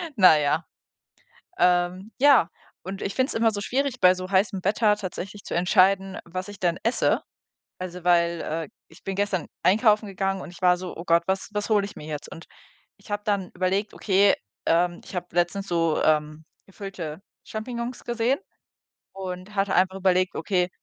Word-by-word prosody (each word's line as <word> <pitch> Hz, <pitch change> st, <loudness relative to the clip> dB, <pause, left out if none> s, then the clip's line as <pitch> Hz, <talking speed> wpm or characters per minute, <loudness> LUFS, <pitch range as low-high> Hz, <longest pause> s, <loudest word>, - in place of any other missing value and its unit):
na 185 Hz, -7 st, +7 dB
ja. 150 Hz, +3 st, +1 dB, 0.9 s
Ähm, 180 Hz, +3 st, +2 dB
ja, 270 Hz, -, +6 dB, 0.3 s
und 190 Hz, +2 st, -6 dB
ich 195 Hz, -, -3 dB
finde 260 Hz, +1 st, +1 dB
es -, -, -4 dB
immer 225 Hz, 0 st, +3 dB
so 205 Hz, -, -4 dB
schwierig, 260 Hz, +3 st, -1 dB
bei 180 Hz, 0 st, +7 dB
so 185 Hz, 0 st, -6 dB
heißem 195 Hz, -1 st, +1 dB
Wetter 210 Hz, +2 st, +3 dB
tatsächlich 200 Hz, +1 st, -6 dB
zu -, -, -5 dB
entscheiden, 190 Hz, +2 st, +3 dB
was 185 Hz, +2 st, -5 dB
ich 205 Hz, -1 st, -10 dB
denn 175 Hz, -2 st, +1 dB
esse. 230 Hz, +3 st, +2 dB, 0.6 s
Also, 180 Hz, -1 st, -7 dB
weil, 170 Hz, -1 st, +3 dB
äh, 160 Hz, 0 st, -3 dB, 0.2 s
ich 160 Hz, -, -19 dB
bin 195 Hz, -, -3 dB
gestern 200 Hz, -4 st, -1 dB, 0.2 s
einkaufen 215 Hz, +2 st, +4 dB
gegangen 195 Hz, 0 st, -2 dB
und 175 Hz, -, -9 dB
ich 175 Hz, -, -15 dB
war 180 Hz, -1 st, +4 dB
so: 180 Hz, 0 st, -7 dB
„Oh 170 Hz, -, -7 dB
Gott, 170 Hz, -1 st, +3 dB
was 190 Hz, 0 st, -2 dB
was 210 Hz, 0 st, -2 dB
hole 210 Hz, -2 st, +3 dB
ich 200 Hz, -, -10 dB
mir 150 Hz, -, -9 dB
jetzt?“ 150 Hz, -2 st, -6 dB
Und 165 Hz, -, -10 dB, 0.5 s
ich -, -, -15 dB
habe 205 Hz, 0 st, -2 dB
dann 200 Hz, -3 st, 0 dB
überlegt: 190 Hz, +3 st, -1 dB
„Okay, 195 Hz, 0 st, +3 dB, 0.3 s
ähm, 175 Hz, +1 st, +2 dB
ich -, -, -12 dB
habe 180 Hz, 0 st, -3 dB
letztens 175 Hz, +3 st, 0 dB
so, 165 Hz, -3 st, +1 dB
ähm, 155 Hz, 0 st, +1 dB, 0.2 s
gefüllte 185 Hz, -5 st, -7 dB, 0.2 s
Champignons 235 Hz, +2 st, -5 dB
gesehen” 240 Hz, +3 st, 0 dB, 0.7 s
und 185 Hz, +1 st, -7 dB
hatte 195 Hz, -1 st, +1 dB
einfach 185 Hz, +1 st, +3 dB
überlegt: 185 Hz, -1 st, +1 dB
„Okay, 180 Hz, -2 st, 0 dB
190 Hz, 180 wpm, -25 LUFS, 175-205 Hz, 0.9 s, na